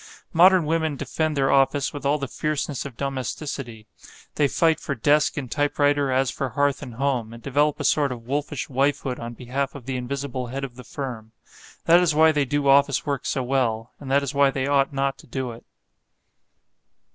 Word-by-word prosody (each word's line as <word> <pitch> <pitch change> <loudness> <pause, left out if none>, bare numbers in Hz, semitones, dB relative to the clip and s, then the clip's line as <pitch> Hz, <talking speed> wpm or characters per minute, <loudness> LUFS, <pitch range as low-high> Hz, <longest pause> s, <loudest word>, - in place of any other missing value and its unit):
Modern 180 0 +6
women 160 -1 0
defend 155 +2 -2
their 135 -1 +2
office 140 +1 +2
with 145 -1 -3
all 145 +2 +2
the 140 -2 -4
fierceness 150 0 -3
of 125 -4 -13
domesticity. 130 -3 -4 0.5
They 145 - +2
fight 160 +3 +2
for 140 - -3
desk 145 +6 +2
and 140 - -2
typewriter 145 -1 +1
as 130 0 +1
for 135 - -3
hearth 140 +3 0
and 120 - -8
home, 125 -4 -1
and 115 - -12
develop 145 +2 +1
a - - -3
sort 145 -3 +2
of 120 -2 -7
wolfish 145 +1 -3
wifehood 135 -1 0
on 120 0 -6
behalf 130 +4 -3
of 135 -4 -10
the 130 -1 -3
invisible 130 0 -4
head 135 +3 -5
of 130 -3 -6
the 125 - -10
firm. 120 -6 -7 0.5
That 170 +1 +7
is 170 -4 +2
why 160 +1 +6
they 145 -2 +1
do 145 +1 -1
office 140 0 +4
work 140 -3 -2
so 135 - -1
well; 120 -3 -1
and 140 - -8
that 140 +1 +3
is 140 +1 -3
why 140 -1 +4
they 135 -1 -2
ought 140 0 +2
not 135 0 -1
to - - -15
do 130 -2 -4
it. 115 - -12
140 Hz, 200 wpm, -24 LUFS, 130-145 Hz, 0.5 s, That